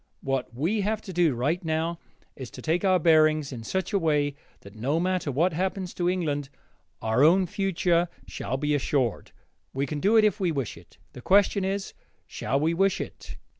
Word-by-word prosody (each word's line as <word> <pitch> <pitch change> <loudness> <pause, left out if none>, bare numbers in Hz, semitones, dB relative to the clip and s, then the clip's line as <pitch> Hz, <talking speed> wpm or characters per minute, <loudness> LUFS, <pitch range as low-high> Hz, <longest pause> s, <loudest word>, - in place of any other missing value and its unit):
What 135 -3 -2
we 165 - -1
have 215 +2 -1
to 190 - -8
do, 170 -6 +2
right 145 +10 -1
now, 160 +1 -1 0.4
is 130 -3 -8
to - - -8
take 165 +2 0
our 190 -2 +4
bearings 155 -3 +3
in 115 -2 -7
such 190 - -3
a 200 - +3
way 150 -4 +1 0.3
that, 100 - -13
no 135 +9 -1
matter 180 -4 -1
what 165 +7 +1
happens 185 +2 -2
to 175 0 0
England, 150 -6 -1 0.5
our 110 +4 +2
own 180 +5 +5
future 175 -2 0 0.2
shall 130 - -4
be 150 +2 0
assured. 135 -4 -1 0.4
We 135 +1 0
can 150 +1 -4
do 210 +8 +3
it 220 - +6
if 210 +1 +1
we 180 -3 +1
wish 135 -7 -3
it: - - -17 0.2
the 125 - -10
question 200 - +3
is, 195 +1 -3 0.3
shall 135 - -2
we 160 +3 +1
wish 195 +3 +2
it? - - -8
165 Hz, 195 wpm, -26 LUFS, 140-185 Hz, 0.5 s, it